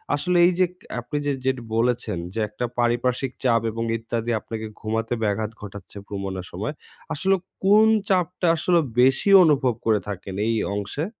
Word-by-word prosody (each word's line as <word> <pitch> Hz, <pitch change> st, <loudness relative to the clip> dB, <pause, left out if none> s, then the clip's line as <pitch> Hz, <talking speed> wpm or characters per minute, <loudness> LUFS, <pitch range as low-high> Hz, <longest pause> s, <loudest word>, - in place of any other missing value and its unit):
আসলে 180 Hz, +5 st, 0 dB
এই 180 Hz, -, +5 dB
যে, 185 Hz, -, +6 dB
ক -, -, -23 dB, 0.3 s
আপনি 145 Hz, +5 st, -4 dB
যে 145 Hz, -, +1 dB
যেটা 130 Hz, -2 st, 0 dB
বলেছেন, 115 Hz, -4 st, 0 dB, 0.2 s
যে 115 Hz, -, -3 dB
একটা 105 Hz, +4 st, -3 dB
পারিপার্শ্বিক 125 Hz, +2 st, +1 dB
চাপ, 115 Hz, -3 st, +3 dB
এবং 115 Hz, +1 st, -3 dB
ইত্যাদি 115 Hz, +1 st, -3 dB
আপনাকে 110 Hz, 0 st, -6 dB
ঘুমাতে 110 Hz, +2 st, -2 dB
ব্যাঘাত 110 Hz, +1 st, -1 dB
ঘটাচ্ছে 100 Hz, -1 st, -10 dB
ভ্রমণের 95 Hz, -2 st, -5 dB
সময়ে। -, -, -4 dB, 0.4 s
আসলে 190 Hz, +6 st, +2 dB, 0.3 s
কোন 210 Hz, +3 st, +6 dB, 0.2 s
চাপটা 180 Hz, -1 st, +1 dB
আসলে 175 Hz, +2 st, +3 dB, 0.2 s
বেশি 135 Hz, +9 st, +3 dB
অনুভব 140 Hz, -6 st, +3 dB
করে 110 Hz, -2 st, +3 dB
থাকেন 95 Hz, -1 st, -6 dB
এই 115 Hz, -, +1 dB, 0.2 s
অংশে? 105 Hz, +10 st, -3 dB
120 Hz, 160 wpm, -23 LUFS, 110-145 Hz, 0.4 s, যে